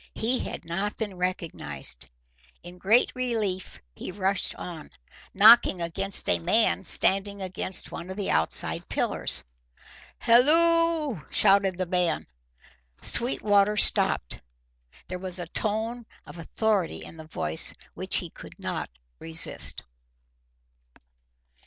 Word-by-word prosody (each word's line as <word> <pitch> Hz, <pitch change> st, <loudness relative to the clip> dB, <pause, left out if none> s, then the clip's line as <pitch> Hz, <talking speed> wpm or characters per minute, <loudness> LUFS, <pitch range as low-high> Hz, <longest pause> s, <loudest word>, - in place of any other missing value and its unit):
He 245 Hz, +3 st, 0 dB
had -, -, -7 dB
not 195 Hz, +5 st, -4 dB
been 215 Hz, -3 st, -5 dB
recognised. 180 Hz, -, -5 dB, 0.5 s
In 175 Hz, +1 st, -13 dB
great 220 Hz, +7 st, +2 dB
relief 220 Hz, -7 st, -3 dB, 0.2 s
he -, -, -8 dB
rushed 195 Hz, 0 st, -1 dB
on, 170 Hz, -3 st, -9 dB, 0.4 s
knocking 215 Hz, -1 st, +6 dB
against 190 Hz, +4 st, +3 dB
a 85 Hz, -, +2 dB
man 195 Hz, -, +2 dB
standing 200 Hz, +3 st, +3 dB
against 185 Hz, 0 st, -1 dB
one 170 Hz, +2 st, -8 dB
of 190 Hz, -, -8 dB
the 200 Hz, -, -3 dB
outside 80 Hz, -, -1 dB
pillars. -, -, -2 dB, 0.7 s
"Halloo!" 315 Hz, -, +3 dB
shouted 195 Hz, -2 st, +2 dB
this 185 Hz, -, -2 dB
man. 175 Hz, -2 st, -1 dB, 0.7 s
Sweetwater 210 Hz, -4 st, +1 dB
stopped. -, -, +1 dB, 0.7 s
There 180 Hz, 0 st, -6 dB
was 185 Hz, -1 st, -4 dB
a 175 Hz, -, -5 dB
tone 220 Hz, +6 st, -3 dB, 0.2 s
of 170 Hz, -, -12 dB
authority 200 Hz, +2 st, -2 dB
in -, -, -12 dB
the 160 Hz, -1 st, -11 dB
voice 80 Hz, -, +3 dB, 0.2 s
which -, -, -5 dB
he -, -, -3 dB
could -, -, -14 dB
not -, -, -5 dB, 0.3 s
resist. 80 Hz, 0 st, +3 dB
195 Hz, 115 wpm, -25 LUFS, 175-220 Hz, 0.7 s, knocking